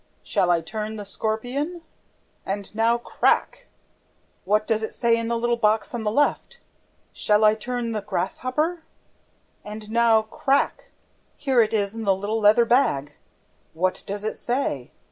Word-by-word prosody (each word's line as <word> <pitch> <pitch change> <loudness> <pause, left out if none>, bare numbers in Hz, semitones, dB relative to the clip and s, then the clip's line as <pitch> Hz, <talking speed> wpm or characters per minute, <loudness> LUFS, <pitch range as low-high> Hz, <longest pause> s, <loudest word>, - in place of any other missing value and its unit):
'SHALL 180 - +1
I 170 -1 +3
TURN 215 +6 -5
THE 205 -1 -7
SCORPION?'... 245 - -3 0.6
And 200 +1 -5
now, 225 +2 +2
crack! 240 - 0 0.8
What 210 +2 +2
does 220 -1 0
it 220 - -5
say 235 -1 +3
in 230 0 -2
the 235 0 0
little 240 0 0
box 215 0 +1
on 240 - -3
the 215 - 0
left? 290 - 0 0.6
'SHALL 210 0 +2
I 215 - +6
TURN 240 +1 -3
THE 215 -2 -2
GRASSHOPPER?'... 255 - -2 0.8
And 210 +1 -8
now, 230 -1 +4
crack! 270 +5 0 0.5
Here 265 -4 +3
it 215 -1 +1
is 200 -1 0
in 225 - -6
the 195 -2 +3
little 205 +4 -2
leather 215 +3 +5
bag... 150 - +2 0.6
What 185 +3 0
does 205 +1 -4
it 215 - -3
say? 240 - -2
220 Hz, 155 wpm, -24 LUFS, 210-240 Hz, 0.8 s, I